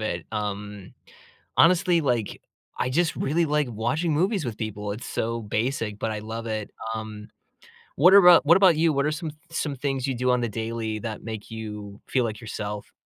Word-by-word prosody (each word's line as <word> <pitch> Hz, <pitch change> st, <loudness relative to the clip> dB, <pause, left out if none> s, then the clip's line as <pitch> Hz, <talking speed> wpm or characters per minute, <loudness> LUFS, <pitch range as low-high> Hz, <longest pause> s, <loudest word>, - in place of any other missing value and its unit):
it, 90 Hz, -6 st, -3 dB
um, 105 Hz, -2 st, -5 dB, 0.6 s
honestly, 175 Hz, 0 st, +5 dB
like, 120 Hz, -8 st, -1 dB, 0.4 s
I 125 Hz, -, 0 dB
just 165 Hz, +4 st, +1 dB
really 165 Hz, +4 st, +1 dB
like 150 Hz, -2 st, +1 dB
watching 125 Hz, +10 st, -1 dB
movies 185 Hz, +1 st, +1 dB
with 115 Hz, -3 st, -4 dB
people. 105 Hz, -2 st, -4 dB
It's 115 Hz, +4 st, -7 dB
so 115 Hz, 0 st, -2 dB
basic, 110 Hz, 0 st, -2 dB
but 110 Hz, -, -2 dB
I 105 Hz, -, -4 dB
love 115 Hz, +2 st, -6 dB
it, 110 Hz, -2 st, -3 dB, 0.2 s
um, 110 Hz, -1 st, -7 dB, 0.7 s
what 180 Hz, +7 st, +6 dB
are -, -, +11 dB
about 175 Hz, -4 st, +8 dB
what 170 Hz, +3 st, +7 dB
about 185 Hz, -5 st, +6 dB
you? 160 Hz, 0 st, +3 dB
What 140 Hz, +1 st, +1 dB
are 155 Hz, -, +1 dB
some 160 Hz, 0 st, -4 dB
th 150 Hz, -, -18 dB
some 145 Hz, -4 st, -2 dB
things 135 Hz, 0 st, -2 dB
you 135 Hz, -, -1 dB
do 125 Hz, +1 st, +1 dB
on 125 Hz, 0 st, +3 dB
the 120 Hz, -, -1 dB
daily 110 Hz, 0 st, -3 dB
that 110 Hz, -2 st, -5 dB
make 110 Hz, -1 st, -7 dB
you 105 Hz, -2 st, -7 dB
feel 125 Hz, -2 st, +1 dB
like 110 Hz, -1 st, -4 dB
yourself? 105 Hz, -2 st, -6 dB
115 Hz, 200 wpm, -25 LUFS, 110-150 Hz, 0.7 s, are